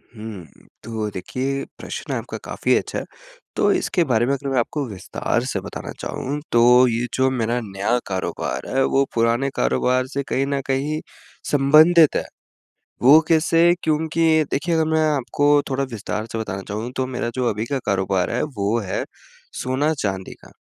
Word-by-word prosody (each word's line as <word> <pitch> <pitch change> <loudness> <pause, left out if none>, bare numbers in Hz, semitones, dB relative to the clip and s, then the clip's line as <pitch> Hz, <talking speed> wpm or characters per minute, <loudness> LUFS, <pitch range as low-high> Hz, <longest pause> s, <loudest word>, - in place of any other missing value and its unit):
हुँ, 105 -5 -8 0.4
तो 110 -2 -3
देखिए, 135 +9 -3
प्रश्न - - -6
आपका - - -4
काफ़ी - - 0
अच्छा - - -1
है। - - -7 0.5
तो - - +3
इसके 175 - +1
बारे 120 -6 +2
में 135 - +1
अगर 140 0 -4
मैं 130 - +1
आपको 140 +4 -2
विस्तार 95 -4 -2
से - - -2
बताना - - -7
चाहूँ, 145 +3 -4
तो 125 +2 +6
ये 120 +1 0
जो 130 0 +3
मेरा 120 -1 0
नया 100 +3 -1
कारोबार 95 -1 -3
है, 135 - +4
वो 135 +1 +3
पुराने 115 +4 +2
कारोबार 130 +1 +1
से 140 +1 -3
कहीं 135 - +1
न 140 -1 -1
कहीं 140 +3 -1 0.5
संबंधित 155 +3 +6
है। - - +1 0.8
वो 140 +6 +8
कैसे, 165 +1 +4
क्योंकि 160 0 +2
देखिए 165 +4 0
अगर 160 - +3
मैं 160 - +3
आपको 145 +1 +1 0.2
थोड़ा 135 +1 0
विस्तार 110 0 -4
से 115 - -3
बताना 95 -3 -4
चाहूँ, 110 +4 -4
तो 130 0 0
मेरा 125 -2 -3
जो 125 -2 0
अभी 105 0 -2
का 140 +2 -1
कारोबार 95 -2 0
है, 120 - 0
वो 115 -6 -1
है 95 -3 -3 0.6
सोना-चांदी 130 -8 -1
का, - - -15
130 Hz, 170 wpm, -22 LUFS, 110-145 Hz, 0.8 s, वो